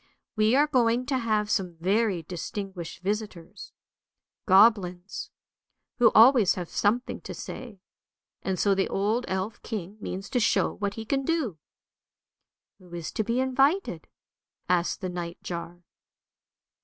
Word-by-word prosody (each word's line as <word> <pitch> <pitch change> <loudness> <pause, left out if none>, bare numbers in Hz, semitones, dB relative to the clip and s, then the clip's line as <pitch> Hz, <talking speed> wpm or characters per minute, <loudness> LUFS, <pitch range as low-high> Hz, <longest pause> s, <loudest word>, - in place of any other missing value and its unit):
We 215 +2 +3
are 290 +2 +5
going 250 -4 +2
to 270 -1 0
have 215 -3 0
some 180 -4 -1
very 190 +1 +1
distinguished 180 +1 -6
visitors, 200 -4 -5 0.8
goblins, 190 -2 +3 0.7
who 235 -2 +7
always 230 -3 +7
have 180 -2 -5
something 235 +5 0
to - - -7
say, 225 -7 -8 0.6
and 190 -1 -2
so 200 +1 +3
the 195 0 +1
old 215 +5 0
elf 190 +3 -3
king 205 -2 -6
means 195 0 -5
to 250 - +2
show 210 - +2
what 200 -1 -3
he 225 - -6
can 270 +4 0
do." 265 - -1 0.6
" - - -62
Who 180 -2 -18
is 170 -2 -5
to 220 - -1
be 235 +4 -1
invited? 270 +8 +1 0.3
" - - -66
asked 180 +2 +1
the 185 - -3
night 175 -1 -5
jar. 175 0 -6
205 Hz, 145 wpm, -27 LUFS, 180-235 Hz, 0.8 s, who